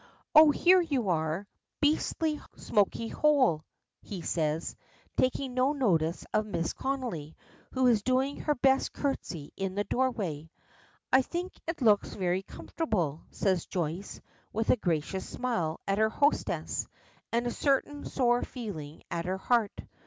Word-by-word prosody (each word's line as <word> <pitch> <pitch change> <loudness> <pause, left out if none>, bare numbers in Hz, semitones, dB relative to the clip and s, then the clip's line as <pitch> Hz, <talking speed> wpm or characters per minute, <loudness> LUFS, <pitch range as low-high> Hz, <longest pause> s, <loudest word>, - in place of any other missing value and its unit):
"Oh! 310 0 +9
here 360 +5 +5
you 270 - -1
are. 160 +3 0 0.3
Beastly, 305 +1 +1
smoky 215 +2 +1
hole!" 260 - +3 0.4
he 190 -5 -7
says, 155 0 -1 0.4
taking 260 0 0
no 255 +3 +2
notice 170 - +1
of 215 - +2
Mrs. 165 -5 -2
Connolly, 245 - -3 0.4
who 260 0 +2
is 235 -4 +4
doing 260 +4 +1
her 295 - 0
best 265 +1 +2
curtsey 175 - -3
in 195 -1 -3
the 205 - +1
doorway. 200 - -1 0.6
"I 260 - +7
think 350 +7 -4
it 330 -5 -3
looks 210 -3 +3
very 185 -1 0
comfortable," 180 - -2
says 185 -4 0
Joyce, 175 +2 -3 0.3
with 225 +1 +1
a - - +5
gracious 180 -2 -2
smile 200 -11 -2
at 195 +1 +1
her 220 0 +4
hostess, 285 +6 0 0.4
and 235 +1 +1
a 240 - 0
certain 285 +2 0
sore 245 -2 +2
feeling 165 - -7
at 170 0 -2
her 185 +1 -1
heart. 225 +1 +1
220 Hz, 140 wpm, -29 LUFS, 175-270 Hz, 0.6 s, Oh